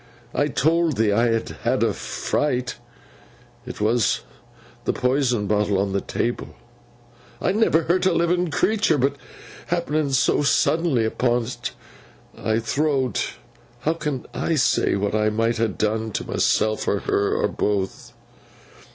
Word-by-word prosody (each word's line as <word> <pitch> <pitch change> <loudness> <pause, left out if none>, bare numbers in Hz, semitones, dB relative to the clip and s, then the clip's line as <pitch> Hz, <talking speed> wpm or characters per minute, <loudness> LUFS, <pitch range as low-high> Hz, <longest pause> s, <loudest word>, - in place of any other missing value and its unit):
I 145 - +1
told 160 +1 +1
thee 110 -1 +3
I 115 +4 +3
had 115 -1 0
had - - +1
a - - +2
fright. 125 -4 -2 0.9
It - - -7
were 110 +3 +2 0.9
the - - +1
Poison 125 -4 +1
bottle 105 -1 +1
on 100 0 0
table. 120 +1 -2 0.8
I - - +1
never 195 -6 +3
hurt 180 +3 +2
a - - +3
livin' 175 +1 +1
creetur; 205 0 +2
but 135 +2 +1 0.5
happenin' 155 -4 0
so 130 - +3
suddenly 145 -2 +2
upon 120 +1 +1
't, 125 - -5 0.7
I 110 - -1
thowt, 130 0 0 0.5
"How 160 - +1
can 150 -5 -4
I 165 - 0
say 140 - +2
what 100 +1 -1
I 110 0 +2
might 115 +2 0
ha' 115 - +3
done 110 +1 -1
to - - -2
myseln, 110 0 +1
or 100 - +1
her, 100 - 0
or - - +1
both!" 100 -2 -2
125 Hz, 140 wpm, -23 LUFS, 110-155 Hz, 0.9 s, thee